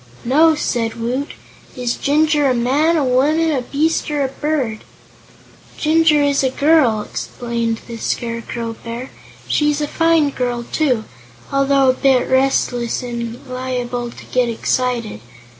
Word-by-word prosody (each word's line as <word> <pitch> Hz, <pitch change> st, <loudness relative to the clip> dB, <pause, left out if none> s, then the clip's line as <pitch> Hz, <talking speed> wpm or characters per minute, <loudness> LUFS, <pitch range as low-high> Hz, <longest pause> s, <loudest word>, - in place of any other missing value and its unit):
"No," 310 Hz, +6 st, +4 dB
said 230 Hz, -6 st, -1 dB
Woot. 250 Hz, +5 st, -2 dB, 0.4 s
"Is 245 Hz, -1 st, -1 dB
Jinjur 295 Hz, 0 st, +2 dB
a 255 Hz, -, +2 dB
man, 285 Hz, +8 st, +2 dB
a 300 Hz, -, +1 dB
woman, 300 Hz, +6 st, +2 dB
a 270 Hz, -4 st, 0 dB
beast 305 Hz, +7 st, 0 dB
or 295 Hz, -1 st, 0 dB
a 265 Hz, -, -1 dB
bird?" 270 Hz, -6 st, -2 dB, 0.9 s
"Jinjur 310 Hz, -1 st, +3 dB
is 280 Hz, -1 st, +2 dB
a 265 Hz, -, +2 dB
girl," 280 Hz, -6 st, +3 dB
explained 235 Hz, -1 st, -3 dB
the 235 Hz, -1 st, -7 dB
Scarecrow 230 Hz, 0 st, -3 dB
Bear. 235 Hz, +3 st, -6 dB, 0.4 s
"She's 295 Hz, -1 st, +1 dB
a 295 Hz, -, -1 dB
fine 325 Hz, -2 st, +2 dB
girl, 245 Hz, -2 st, -2 dB
too, 255 Hz, -8 st, +1 dB, 0.5 s
although 275 Hz, -1 st, +3 dB
a -, -, -3 dB
bit 260 Hz, -1 st, +2 dB
restless 260 Hz, -3 st, +1 dB
and 235 Hz, +1 st, -6 dB
liable 250 Hz, -1 st, -3 dB
to -, -, -12 dB
get 250 Hz, -1 st, 0 dB
excited. 235 Hz, -, -1 dB
260 Hz, 140 wpm, -18 LUFS, 240-295 Hz, 0.9 s, No